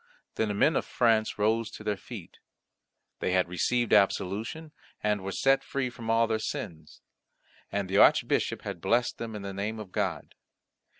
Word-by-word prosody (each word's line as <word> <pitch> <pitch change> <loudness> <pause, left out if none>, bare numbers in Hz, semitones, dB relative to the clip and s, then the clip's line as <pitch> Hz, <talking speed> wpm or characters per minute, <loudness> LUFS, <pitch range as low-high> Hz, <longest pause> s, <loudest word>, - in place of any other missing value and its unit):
Then 110 - 0
the 105 - -2
men 150 +9 +3
of - - +1
France 110 -2 +2
rose 110 +2 +1
to - - -10
their 105 - 0
feet. 105 -4 -10 0.8
They 90 - 0
had 90 -1 +3
received 120 +7 0
absolution, 105 - +1 0.3
and 105 -1 +1
were 95 +1 -4
set 135 +6 +3
free 135 -2 -2
from 115 -1 -8
all 115 0 +4
their 110 -1 -1
sins, 80 -7 -6 0.7
and 100 -1 -1
the 95 +2 0
Archbishop - - +3
had 85 - -6
blessed 120 +5 +1
them 115 -2 -5
in 105 - -6
the 100 0 -5
name 105 +3 -3
of 105 -4 -8
God. - - -2
110 Hz, 175 wpm, -28 LUFS, 100-115 Hz, 0.8 s, all